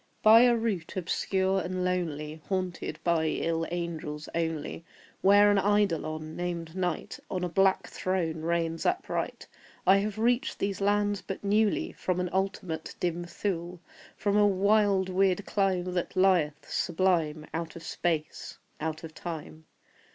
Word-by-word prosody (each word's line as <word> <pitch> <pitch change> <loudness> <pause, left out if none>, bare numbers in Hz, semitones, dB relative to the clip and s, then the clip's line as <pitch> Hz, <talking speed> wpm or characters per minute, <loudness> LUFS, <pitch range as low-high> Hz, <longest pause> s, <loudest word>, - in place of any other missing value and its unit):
By 220 +2 +9
a 245 -1 +5
route 205 -7 -2
obscure 190 +1 0
and 180 +1 -2
lonely, 160 -4 -2
Haunted 185 -2 -2
by 165 -2 +2
ill 165 +1 -1
angels 160 -3 -4
only, 165 -1 -2 0.4
Where 205 +1 +6
an 205 - +4
Eidolon, 165 -6 0
named 170 -2 -4
NIGHT, 180 -3 -2
On 180 -1 -2
a - - +1
black 195 +3 +3
throne 170 -4 -2
reigns 165 0 -1
upright, - - -2 0.4
I 190 +2 +7
have 205 +1 -2
reached 245 +6 +1
these 200 -1 -2
lands 205 0 +1
but 195 - -6
newly 210 +1 +2
From 185 -1 -2
an 180 -1 -2
ultimate 190 -4 -2
dim 175 -1 -1
Thule 175 0 -3 0.4
From 205 -1 0
a 205 0 +6
wild 200 -1 +3
weird 190 +1 +1
clime 185 -3 0
that 175 -1 -2
lieth, 180 -6 +2
sublime, 165 -4 0
Out 165 0 -4
of 170 - -9
SPACE 160 -3 -3 0.2
out 155 +1 -3
of 160 -1 -8
TIME. 160 -2 -7
180 Hz, 145 wpm, -29 LUFS, 165-195 Hz, 0.4 s, By